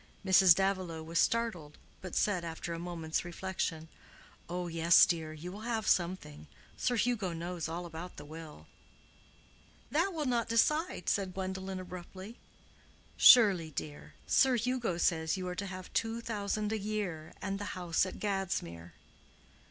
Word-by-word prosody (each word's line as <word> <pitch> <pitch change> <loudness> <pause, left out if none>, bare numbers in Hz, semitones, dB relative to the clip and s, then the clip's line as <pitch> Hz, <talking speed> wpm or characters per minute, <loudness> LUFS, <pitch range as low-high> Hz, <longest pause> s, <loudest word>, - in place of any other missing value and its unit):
Mrs. 190 -2 +7
Davilow 185 -4 -1
was 165 +1 -1
startled, 215 -11 0 0.2
but 185 - -7
said, 185 -5 +1
after 170 +1 -5
a 165 - -5
moment's 165 -2 -3
reflection, 175 -2 -4 0.6
"Oh 180 +1 -3
yes, 165 0 +6
dear, 160 -2 -2
you 160 +3 -8
will 200 - -8
have 225 -1 -2
something. 170 - 0 0.3
Sir 245 - 0
Hugo 225 -6 0
knows 170 0 -4
all 175 +2 -4
about 170 +2 -8
the - - -9
will." 155 - -10 1.3
"That 335 +7 +2
will 315 -4 -3
not 235 -3 0
decide," 300 - +1
said 190 -2 0
Gwendolen, 190 0 -4
abruptly. 185 +4 -9 0.8
"Surely, 195 -9 +7
dear: 150 0 -7
Sir 260 -1 +4
Hugo 240 -5 -1
says 160 0 +1
you 185 -1 -4
are 180 - -3
to 200 +2 -4
have 185 -1 -8
two 225 0 0
thousand 210 -2 -2
a 220 - -1
year 195 -7 -4
and 195 +1 -3
the 205 -1 -5
house 175 -2 +1
at 185 - -4
Gadsmere." 175 - -3
185 Hz, 150 wpm, -32 LUFS, 165-210 Hz, 1.3 s, Mrs